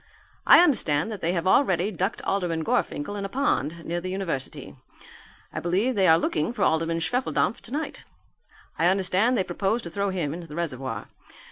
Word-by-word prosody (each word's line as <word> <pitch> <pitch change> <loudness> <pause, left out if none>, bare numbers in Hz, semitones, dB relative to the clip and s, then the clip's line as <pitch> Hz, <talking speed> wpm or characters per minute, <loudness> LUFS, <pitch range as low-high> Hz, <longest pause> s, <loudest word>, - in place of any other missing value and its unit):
I - - +9
understand 220 - +2
that 210 - -6
they 170 +2 0
have 170 -1 -2
already 190 -2 +3
ducked 190 +3 -2
Alderman 175 -5 -1
Gorfinkel 155 +4 -1
in 200 - -4
a 195 - -4
pond 170 - -1
near 175 +1 -2
the 185 - -5
university. 185 -8 -4 0.8
I - - -3
believe 195 +9 0
they 195 -4 +3
are 160 - +7
looking 155 +4 -1
for - - -1
Alderman 165 +1 +1
Schwefeldampf 235 +1 0
tonight. 290 +7 -5 0.8
I 165 - +4
understand 195 +6 +2
they 190 - +2
propose 195 +6 -1
to 170 - -7
throw 200 +3 -1
him 170 -6 -2
into 170 0 -8
the 150 - -9
reservoir. 135 -9 -4
180 Hz, 175 wpm, -25 LUFS, 165-200 Hz, 0.8 s, I